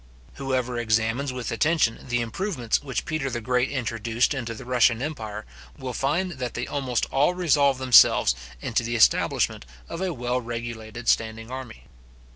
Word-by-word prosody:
Whoever 130 -3 -2
examines 115 +4 0
with 125 -1 -5
attention, 145 -1 +1
the 120 0 +1
improvements 120 - -1
which 135 -3 -3
Peter 155 -4 -2
the 120 -1 -3
Great 125 +2 0
introduced 115 -1 0
into 120 -4 -4
the 130 - -10
Russian 120 -2 +3
empire, 110 -7 -5 0.3
will 130 -1 -5
find 165 +9 0
that 125 -2 -4
they 120 - -2
almost 130 -4 -1
all 145 +6 +2
resolve 145 -6 +3
themselves 130 - +6 0.3
into 115 - 0
the 120 +1 -3
establishment 110 - +3 0.2
of 165 - -6
a 190 -1 0
well 125 -3 -2
regulated 115 -1 -6
standing 115 +1 0
army. 130 - -8
125 Hz, 155 wpm, -25 LUFS, 115-135 Hz, 0.3 s, themselves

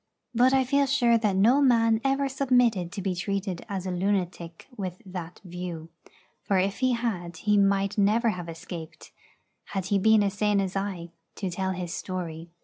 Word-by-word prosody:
But 245 +2 +4
I 265 0 +4
feel 280 +2 +2
sure 240 -4 +3
that 210 -4 +1
no 235 +9 +4
man 230 -4 +4
ever 275 0 +1
submitted 245 -9 +2
to 200 -1 -5
be 190 -1 0
treated 195 0 -3
as 190 -2 -3
a 185 - -2
lunatic 180 -3 -2
with 185 -4 -5
that 180 -2 -7
view; 175 -2 -6 0.5
for 195 - 0
if 195 +2 0
he 255 -1 +2
had 185 -8 -3
he 210 +4 +1
might 200 0 +2
never 220 +4 +3
have 180 -4 -4
escaped, 165 -1 -9 0.5
had 195 -2 -4
he 200 - +4
been 220 +1 +5
as 200 -1 0
sane 205 0 +1
as 190 -1 -2
I, 190 -4 -3 0.2
to 190 -3 -3
tell 190 +2 -2
his 175 -1 -5
story. 170 -3 -5
195 Hz, 180 wpm, -27 LUFS, 180-230 Hz, 0.5 s, been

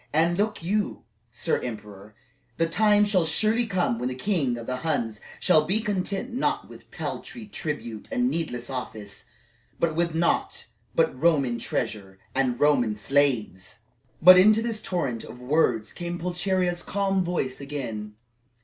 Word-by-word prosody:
And 165 +3 +3
look 210 -2 -1
you, 205 -1 -1 0.3
sir - - 0
emperor, 105 -3 -8 0.4
the 165 - +3
time 210 +4 +4
shall 195 -4 +2
surely 220 +7 +2
come 180 - 0
when 125 +1 -1
the 130 - -4
king 135 -5 0
of 115 - -7
the 125 +1 -3
Huns 120 -8 -2 0.2
shall 155 - +4
be 190 +8 0
content 205 +2 -2
not 255 - -1
with - - -14
paltry 230 - -6
tribute 150 - -5
and 250 -2 +1
needless 135 - -3
office, 110 -6 -7 0.5
but 170 -2 +1
with 170 -1 0
naught 170 +1 0 0.3
but 160 -3 +2
Roman 140 -8 +2
treasure 95 -3 -3 0.2
and 130 -2 0
Roman 130 -7 +3
slaves!" 115 -6 0 0.4
But 185 +2 +10
into 215 +4 +5
this 225 -2 -2
torrent 140 - -2
of 125 - -10
words 125 -4 +1
came 175 0 -4
Pulcheria's 180 0 -1
calm 195 -1 0
voice 165 -7 -2
again. 115 -7 -5
160 Hz, 150 wpm, -26 LUFS, 120-190 Hz, 0.5 s, But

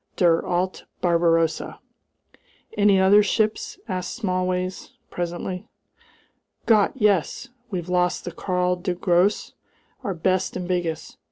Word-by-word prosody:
Der 170 -2 +3
alte 180 +1 -2
Barbarossa!" 165 -2 +1 1.0
"Any 205 -2 +4
other 195 +2 +6
ships?" 215 +1 0
asked 185 -3 -3
Smallways, 185 -3 -2 0.2
presently. 175 +1 -4 1.0
"Gott! 215 -3 +4
Yes! 205 - +1 0.2
We've 180 -5 -4
lost 180 0 0
the 175 - -4
Karl 180 +1 -1
der 180 0 -2
Grosse, 180 +3 +1 0.5
our 195 - -2
best 185 +2 0
and 180 -1 -5
biggest. 175 -3 -3
180 Hz, 110 wpm, -23 LUFS, 175-195 Hz, 1.0 s, other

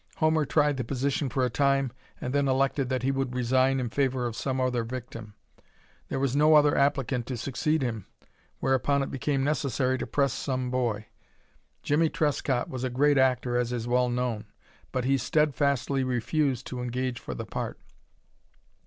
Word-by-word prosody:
Homer 155 -1 +2
tried 145 +3 +2
the 130 - -1
position 140 +2 -1
for 130 +1 +1
a - - 0
time, 135 -1 +2 0.3
and 125 - -4
then 140 -1 +2
elected 135 0 +1
that 130 -2 -1
he 135 - +2
would 135 -2 -2
resign 130 +2 +2
in 125 -2 -2
favor 130 -2 0
of 120 -2 -3
some 130 +2 -2
other 125 -2 0
victim. 115 -3 -7 0.7
There 135 - -3
was 135 -1 0
no 155 +2 +5
other 145 -1 +5
applicant 135 -3 +1
to 130 - -3
succeed 140 +5 0
him, 115 -6 -3 0.5
whereupon 135 +1 +1
it - - -5
became 135 0 -1
necessary 135 -3 0
to - - -4
press 140 -3 +1
some 130 -2 -2
boy. 115 -4 -1 0.8
Jimmie 155 +2 +2
Trescott 140 -5 0
was 130 -1 -5
a 130 - 0
great 140 +3 +3
actor, 125 -2 +2
as 125 -1 0
is 120 -1 -3
well 125 0 +2
known, 120 -3 -2 0.5
but 125 -1 -1
he 135 +1 +2
steadfastly 140 -1 +1
refused 130 +1 0
to 125 -1 -5
engage 125 0 -2
for - - -6
the - - -5
part. - - -5
130 Hz, 175 wpm, -27 LUFS, 125-140 Hz, 0.8 s, no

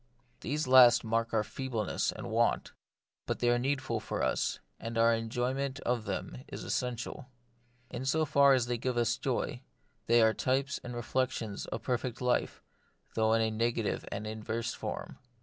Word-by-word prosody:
These 150 +3 -2
last 125 -2 +8
mark 115 +1 0
our 110 -2 +2
feebleness 115 -3 -2
and - - -7
want; - - +1 0.6
but - - -1
they 120 0 +2
are 120 - +2
need 135 +2 0
ful 115 -4 -1
for 110 - -3
us, - - 0 0.2
and 115 0 -5
our 115 0 +5
enjoyment 125 +4 -2
of 120 -3 -1
them 60 - -4
is - - -7
essen 125 -1 -1
tial. 125 +3 -7 0.6
In 125 - -4
so 155 +4 +2
far 140 -2 +5
as 125 -2 +1
they 120 -1 -2
give 125 +1 -1 0.3
joy, - - -1 0.5
they 115 0 +6
are 110 0 +5
types 135 +4 0
and 120 0 -6
reflections 120 -3 -2
of - - -4
the - - -24
perfect 125 -1 -2
life, 125 -1 0 0.5
though 110 0 +2
in 115 0 +3
a 110 - 0
negative 115 0 0
and 105 - -4
inverse 110 +1 -3
form. - - -6
120 Hz, 175 wpm, -31 LUFS, 115-130 Hz, 0.6 s, last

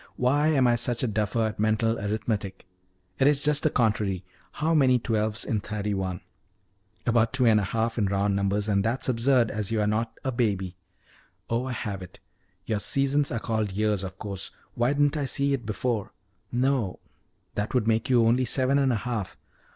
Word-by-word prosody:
Why 145 +5 +2
am 140 -5 +3
I 120 -1 +4
such 120 0 0
a - - +2
duffer 110 +1 0
at 110 -1 -4
mental 110 +1 +1
arithmetic! 100 -2 -3 0.5
It 135 - +5
is 145 -1 +4
just 150 0 +1
the 155 - +2
contrary 105 -7 0 0.3
how 160 +2 0
many 130 -5 +5
twelves 110 -1 -1
in 110 -5 0
thirty 105 0 -3
one? 95 -2 -3 0.8
About 115 -1 +2
two 130 -2 +2
and 110 -2 +5
a - - -1
half 115 +3 -1
in 105 - +2
round 100 +1 +1
numbers, 100 +1 0
and 100 -2 +2
that's 120 +5 -1
absurd, 125 -1 +3
as 105 -3 -2
you 115 - 0
are 105 - +2
not 110 +2 -1
a 135 - -1
baby. 100 -7 -1 0.8
Oh, 115 +2 0
I 130 - -3
have 100 -4 -4
it: 90 - -11 0.5
your 110 -2 -1
seasons 140 +6 +2
are 115 - -1
called 110 -3 -2
years, 105 -1 +1
of 95 0 -7
course 100 -2 -4 0.2
why 120 +2 +1
didn't 145 +1 +2
I 145 - -1
see 140 +1 +1
it 125 -5 -3
before! 110 0 -2 0.4
No, 125 -5 0 0.6
that 105 +4 -3
would 115 -3 +2
make 115 +1 +1
you 120 -3 +4
only 120 +3 +3
seven 130 +3 +2
and 135 -2 +3
a - - +1
half. 110 -6 -3
115 Hz, 195 wpm, -26 LUFS, 105-130 Hz, 0.8 s, It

